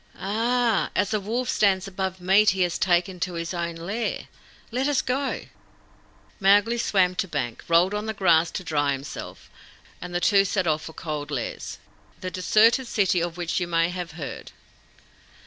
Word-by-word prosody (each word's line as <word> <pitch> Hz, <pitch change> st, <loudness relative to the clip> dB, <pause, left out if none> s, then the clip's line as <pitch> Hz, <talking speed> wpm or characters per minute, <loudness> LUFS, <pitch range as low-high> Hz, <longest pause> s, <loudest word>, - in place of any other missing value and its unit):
"Ah! 230 Hz, +2 st, +1 dB
As 200 Hz, +2 st, +1 dB
a 215 Hz, -, +2 dB
wolf 235 Hz, +5 st, -2 dB
stands 195 Hz, -3 st, +2 dB
above 190 Hz, -1 st, -4 dB
meat 195 Hz, +4 st, +4 dB
he 185 Hz, -, +3 dB
has 175 Hz, 0 st, -1 dB
taken 180 Hz, 0 st, +1 dB
to 180 Hz, +1 st, -2 dB
his 170 Hz, +1 st, -4 dB
own 170 Hz, -1 st, -3 dB
lair. 200 Hz, +8 st, -3 dB, 0.4 s
Let 255 Hz, +4 st, 0 dB
us 290 Hz, -2 st, +2 dB
go." 265 Hz, +2 st, -1 dB, 1.0 s
Mowgli 205 Hz, +4 st, +4 dB
swam 185 Hz, -5 st, +2 dB
to 190 Hz, -, 0 dB
bank, 135 Hz, -8 st, -4 dB
rolled 170 Hz, +4 st, +4 dB
on 210 Hz, +1 st, -3 dB
the 220 Hz, -, -3 dB
grass 170 Hz, -4 st, +4 dB
to 185 Hz, -, -6 dB
dry 145 Hz, -4 st, +1 dB
himself, 135 Hz, +1 st, -8 dB, 0.5 s
and 180 Hz, -, -7 dB
the -, -, +2 dB
two 195 Hz, +1 st, +4 dB
set 190 Hz, -1 st, -1 dB
off 155 Hz, -1 st, 0 dB
for 160 Hz, -, -8 dB
Cold 150 Hz, -3 st, -5 dB
Lairs, 135 Hz, -5 st, -4 dB, 0.4 s
the 185 Hz, -, -5 dB
deserted 225 Hz, +8 st, +3 dB
city 190 Hz, -6 st, +1 dB
of 170 Hz, 0 st, -3 dB
which 175 Hz, 0 st, -1 dB
you 175 Hz, -, -2 dB
may 165 Hz, 0 st, +2 dB
have 180 Hz, -3 st, -5 dB
heard. 155 Hz, -4 st, -7 dB
185 Hz, 175 wpm, -25 LUFS, 170-210 Hz, 1.0 s, meat